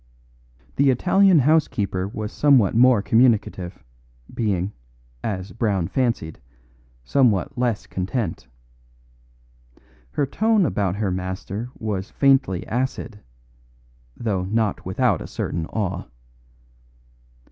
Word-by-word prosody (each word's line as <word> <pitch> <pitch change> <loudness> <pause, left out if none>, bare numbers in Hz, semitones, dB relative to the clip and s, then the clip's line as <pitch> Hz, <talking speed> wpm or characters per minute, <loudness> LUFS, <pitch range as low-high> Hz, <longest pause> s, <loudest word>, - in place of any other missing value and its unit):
The 140 0 +4
Italian 185 +8 +4
housekeeper 125 -10 +1
was 105 +1 -5
somewhat 135 -9 +4
more 120 -2 +5
communicative, 110 -7 +1 0.5
being, 100 -3 -1 0.5
as 95 -2 -4
Brown 100 -7 0
fancied, 115 -11 -1 0.6
somewhat 120 - +2
less 120 -4 -1
content. 95 - -3 1.6
Her 140 - 0
tone 215 +6 +2
about 100 - 0
her 100 -2 -1
master 95 +5 -4
was 100 -3 -3
faintly 135 -10 +2
acid; 120 -3 -3 1.0
though 100 -6 -1
not 110 +1 -1
without - - +1
a - - -6
certain 80 -1 -3
awe. 95 -2 -3
110 Hz, 95 wpm, -23 LUFS, 95-130 Hz, 1.6 s, more